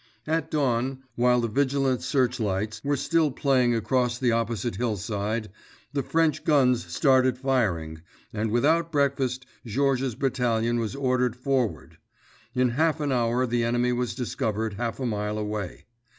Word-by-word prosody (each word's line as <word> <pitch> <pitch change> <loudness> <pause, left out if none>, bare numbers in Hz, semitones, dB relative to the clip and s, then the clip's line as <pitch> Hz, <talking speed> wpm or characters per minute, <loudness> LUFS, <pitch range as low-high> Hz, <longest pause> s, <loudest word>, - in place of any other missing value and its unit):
At 160 0 -1
dawn, 130 -3 0
while 125 0 +3
the 115 - 0
vigilant 135 +1 +1
searchlights 110 -6 -1
were 145 0 0
still 165 +2 +2
playing 130 -3 +2
across 120 +2 0
the 125 -1 +1
opposite 115 -1 -1
hillside, 105 -1 -2 0.4
the 140 - 0
French 155 +2 +1
guns 130 -5 +3
started 130 -3 +3
firing, 95 -13 -1 0.3
and, 110 +1 -1
without 160 +9 +2
breakfast, 135 -3 0 0.2
Georges's 130 +1 0
battalion 120 -3 0
was 115 +2 -3
ordered 125 -3 +1
forward. 125 -2 -2 0.6
In 125 0 +3
half 155 +5 +1
an 145 -2 -1
hour 120 0 +1
the 120 -1 0
enemy 120 +1 +1
was 125 0 -2
discovered 110 -4 -2
half 115 +2 -3
a 130 - -2
mile 105 -2 -2
away. 105 -3 -4
125 Hz, 140 wpm, -26 LUFS, 115-135 Hz, 0.6 s, while